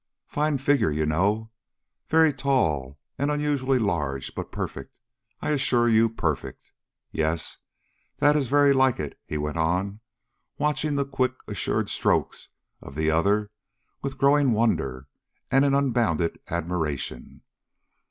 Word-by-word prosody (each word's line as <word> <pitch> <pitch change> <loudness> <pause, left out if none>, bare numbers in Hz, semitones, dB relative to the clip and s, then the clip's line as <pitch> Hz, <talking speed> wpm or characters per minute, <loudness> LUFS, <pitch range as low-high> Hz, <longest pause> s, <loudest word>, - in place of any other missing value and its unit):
Fine 150 -1 0
figure, 135 - +2
you 75 +1 0
know, 100 +8 0 0.6
very 160 -1 +5
tall 80 - 0 0.2
and 140 +1 +1
unusually 145 -3 +1
large, 70 - -1
but - - -6
perfect, - - -6 0.5
I - - 0
assure 130 -4 +2
you, 115 0 +4
perfect. 80 -10 -4 0.4
Yes, 80 +1 -2 0.6
that 145 0 +4
is 140 -4 +1
very 145 +2 +5
like 130 -2 +3
it," 75 -2 -5
he 75 - -3
went 75 +1 -3
on 90 +5 0 0.6
watching 150 0 0
the 140 -1 +1
quick, 130 -2 0
assured 100 -6 -1
strokes - - 0 0.3
of 70 - -11
the 80 +1 +1
other 100 +6 +1 0.5
with 135 0 -4
growing 140 -2 +4
wonder 70 - 0 0.4
and 135 +1 +5
an 140 -1 +3
unbounded 115 - +1
admiration. 85 -4 -3
115 Hz, 130 wpm, -25 LUFS, -, 0.6 s, very